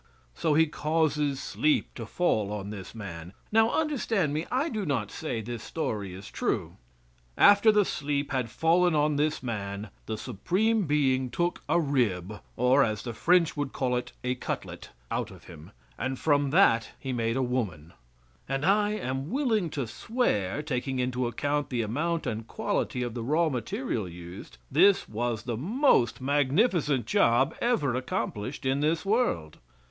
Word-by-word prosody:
So 150 - +1
He 160 +1 +6
causes 150 -2 0
sleep 150 +2 0
to 115 -3 -7
fall 110 - 0
on 105 -1 -4
this 100 +1 -8
man 90 -5 -8 0.2
now 225 +1 +5
understand 235 - 0
me, 155 +3 -2
I 265 +5 +1
do 215 -9 -3
not 130 - -1
say 125 -8 -3
this 120 +1 -6
story 105 - -3
is 95 +2 -10
true. - - -2 0.6
After 205 +2 +7
the 210 -1 +3
sleep 145 -2 -2
had 130 -4 -1
fallen 170 +6 +3
on 150 0 +2
this 150 0 0
man 100 -3 -4 0.2
the 110 - -3
Supreme 185 - 0
Being 130 -3 +2
took 175 +8 -1
a - - +4
rib, 110 - 0 0.2
or, 125 +3 +4
as 110 -3 -2
the 120 - -5
French 170 +7 +3
would 145 -2 -3
call 125 -2 0
it, 125 - -3
a 125 0 0
cutlet, 125 - -5 0.2
out - - -1
of - - -14
him, 80 +1 -12 0.3
and 130 0 -2
from 145 -1 +2
that 125 - +4
He 130 -2 -4
made 115 0 0
a 130 - +1
woman; 105 -11 -3 0.6
and 135 +2 -1
I 205 +2 +3
am 135 -7 -3
willing 225 - +1
to 140 -3 -3
swear, 130 - -1
taking 135 -2 -2
into 125 0 0
account 145 +5 -1
the 120 -3 -1
amount 160 +10 -1
and 110 +1 -3
quality 125 - -2
of 120 -2 -4
the 120 - -4
raw 155 +7 +2
material 115 -5 -3
used, 85 +2 -10
this 190 +7 +5
was 115 0 -2
the 120 -2 -3
most 190 - +2
magnificent 145 - +2
job 120 +6 +3
ever 225 - +1
accomplished 125 -1 -3
in 135 +1 +1
this 160 +3 0
world. 195 - 0
135 Hz, 165 wpm, -28 LUFS, 115-165 Hz, 0.6 s, After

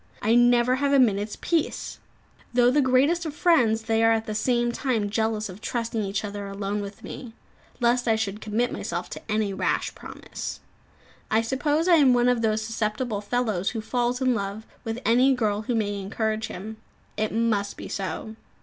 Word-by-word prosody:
I 220 +2 +3
never 240 +1 +4
have 280 +1 +1
a - - +6
minute's 210 -4 +2
peace. 330 -3 -1 0.6
Though 245 0 +5
the 290 +3 +3
greatest 275 +7 +3
of 300 - -6
friends, 240 -11 +3
they 225 0 +1
are 225 - +5
at 225 0 +1
the 215 - -4
same 240 +2 +1
time 235 -5 -1
jealous 220 -1 0
of 190 +2 -10
trusting 230 -2 -2
each 200 +1 -2
other 205 -1 -5
alone 200 +1 -3
with 200 0 -8
me, 235 -4 -8 0.5
lest 245 0 +2
I 225 - +4
should 215 -1 -3
commit 225 +3 0
myself - - -4
to - - -7
any 210 -2 0
rash - - -1
promise. - - -7 0.7
I 220 +1 +2
suppose 290 +7 0
I 345 -2 +6
am 265 -5 +5
one 245 0 +3
of 245 -2 +2
those 220 -1 +1
susceptible 215 0 -2
fellows 210 -4 0
who 230 - -4
falls 245 +2 -1
in 255 -1 +3
love 200 0 -4 0.2
with 225 +1 -3
any 255 +4 +4
girl 210 -4 0
who 235 +2 -2
may 205 -2 -1
encourage 220 +2 -2
him. 215 +4 -7 0.4
It 215 0 -1
must 215 -3 0
be - - -7
so. 205 +3 -4
225 Hz, 185 wpm, -25 LUFS, 210-245 Hz, 0.7 s, a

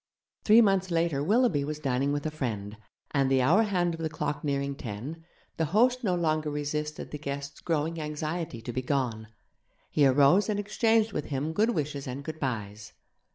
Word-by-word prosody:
Three 225 +2 +8
months 195 -3 +2
later 165 -4 +1
Willoughby 205 - +3
was 150 +1 -3
dining 135 -1 0
with 145 +1 -2
a 155 - -1
friend, 110 -8 -4 0.4
and 135 -2 +2
the 135 -1 +3
hour 170 - +5
hand 180 -5 +1
of 165 - -7
the 160 -1 -2
clock 150 -2 -3
nearing 140 -1 -1
ten, 135 +5 -7 0.3
the 160 - +1
host 250 +2 +4
no 185 -5 +1
longer 155 -3 0
resisted 150 +1 -3
the 150 - -5
guest's 140 0 -5
growing 165 0 -1
anxiety 155 -4 -4
to 120 - -5
be 130 - -1
gone. 125 -5 -1 0.6
He 145 -2 +4
arose 140 +10 +4
and 205 -1 0
exchanged 220 +1 +2
with 150 - -2
him 145 +3 -2
good 220 +5 +2
wishes 145 -3 -3
and 130 +2 -5
goodbyes. 110 -9 -5
150 Hz, 180 wpm, -28 LUFS, 140-170 Hz, 0.6 s, Three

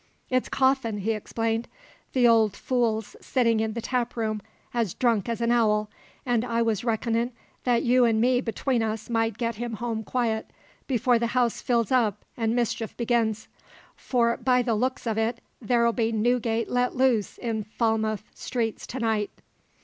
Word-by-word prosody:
"It's 255 0 +1
Coffin," 260 -5 +2
he 205 +3 -1
explained. 225 +1 -2 0.5
"The 250 -2 +5
old 220 -3 +4
fool's 225 -4 -1
sitting 230 -4 +2
in 220 0 -1
the 230 0 -5
taproom 230 -4 -1 0.3
as 230 -7 -1
drunk 230 -4 +1
as 230 0 -2
an 235 0 +2
owl, 215 -3 +2 0.3
and 240 -3 +1
I 235 -1 0
was 220 -3 0
reckonin' 230 +1 0 0.3
that 245 -2 +2
you 250 +1 +4
an' 220 -1 +2
me 245 +2 +3
between 240 +1 -1
us 220 +1 -3
might 225 -2 +1
get 230 -2 -2
him 240 0 -4
home 225 0 -3
quiet 225 -1 -1 0.4
before 245 -2 +2
the 235 - 0
house 240 -2 +2
fills 235 -2 +1
up 220 -5 +1
an' 225 -1 0
mischief 230 -2 -1
begins; 230 -2 0 0.5
for 235 -2 +1
by 250 0 +2
the 235 -1 0
looks 255 +5 -1
of 225 -1 0
it 225 +1 0 0.2
there'll 235 +1 +2
be 225 -1 0
Newgate 230 0 +1
let 245 0 +1
loose 250 -5 +2
in 225 -3 -2
Falmouth 220 0 0
streets 230 -3 -3
to 260 - -5
night." 220 -3 0
230 Hz, 165 wpm, -26 LUFS, 220-245 Hz, 0.5 s, The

